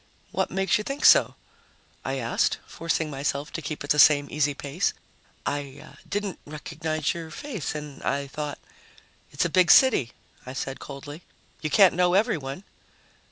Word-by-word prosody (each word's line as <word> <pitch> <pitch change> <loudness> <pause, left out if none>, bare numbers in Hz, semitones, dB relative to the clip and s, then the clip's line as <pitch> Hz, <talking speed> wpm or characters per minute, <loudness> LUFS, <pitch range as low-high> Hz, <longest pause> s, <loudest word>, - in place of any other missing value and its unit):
"What - - 0
makes 190 0 +1
you - - -3
think 275 +5 -3
so?" - - +7 0.7
I - - -2
asked, - - 0
forcing 165 -2 -2
myself 140 +1 -3
to 165 - -4
keep 150 0 -5
at 145 - -2
the 150 - +3
same 145 -1 +6
easy 150 -1 +1
pace. 145 +7 -1 0.5
"I 140 -1 -5
didn't 205 -2 -3
recognize 155 0 -3
your 165 -1 -7
face 210 - -5
and 150 -2 -7
I 140 0 -1
thought 145 +1 -5 0.4
" - - -29
"It's 145 - 0
a - - +3
big 180 +1 +4
city," 225 - +6 0.3
I 130 - -8
said 135 0 -4
coldly. 145 +3 -9 0.4
"You 155 - -2
can't 190 +5 +6
know 180 +1 +2
everyone." 180 - 0
150 Hz, 160 wpm, -26 LUFS, 140-180 Hz, 0.7 s, so